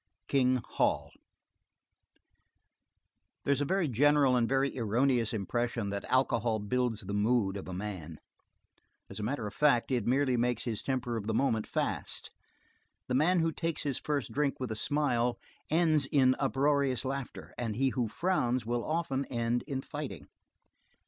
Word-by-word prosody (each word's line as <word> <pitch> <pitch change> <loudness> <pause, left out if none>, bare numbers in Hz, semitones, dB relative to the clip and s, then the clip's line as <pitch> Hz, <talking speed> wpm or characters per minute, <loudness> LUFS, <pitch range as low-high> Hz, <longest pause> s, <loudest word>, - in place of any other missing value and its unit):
King 130 -3 +2
Hol - - 0 2.3
There 140 - +3
is 140 - -1
a - - +1
very 185 +2 +1
general 140 +1 +4
and 120 -2 +2
very 135 +1 +1
erroneous 120 0 +1
impression 115 0 -2
that 100 0 -4
alcohol 120 -3 +2
builds 115 +1 -1
the 100 0 -6
mood 105 -1 +2
of 100 - -6
a 95 - -5
man; 90 -6 -6 0.9
as 100 - -7
a - - -3
matter 120 0 -2
of 105 - -5
fact 140 -4 +3
it 120 -4 0
merely 130 0 +2
makes 120 -1 0
his 110 -4 -2
temper 125 -3 -2
of 105 -2 -5
the 110 - 0
moment 115 -4 +1
fast - - -2 0.8
the - - -2
man 165 +7 +3
who 165 0 +1
takes 165 0 -2
his 140 -4 -1
first 145 -4 -2
drink 140 -1 0
with 130 -3 -3
a - - -2
smile 125 -2 0 0.3
ends 155 -3 +3
in 130 -3 +4
uproarious 135 -2 +1
laughter, 135 0 -5
and 115 -3 -3
he 135 +3 +2
who 125 -2 -1
frowns 125 - 0
will 120 +1 -1
often 155 -4 -1
end 120 0 -1
in 135 -3 -2
fighting. 145 -2 -6
125 Hz, 160 wpm, -31 LUFS, 115-140 Hz, 2.3 s, general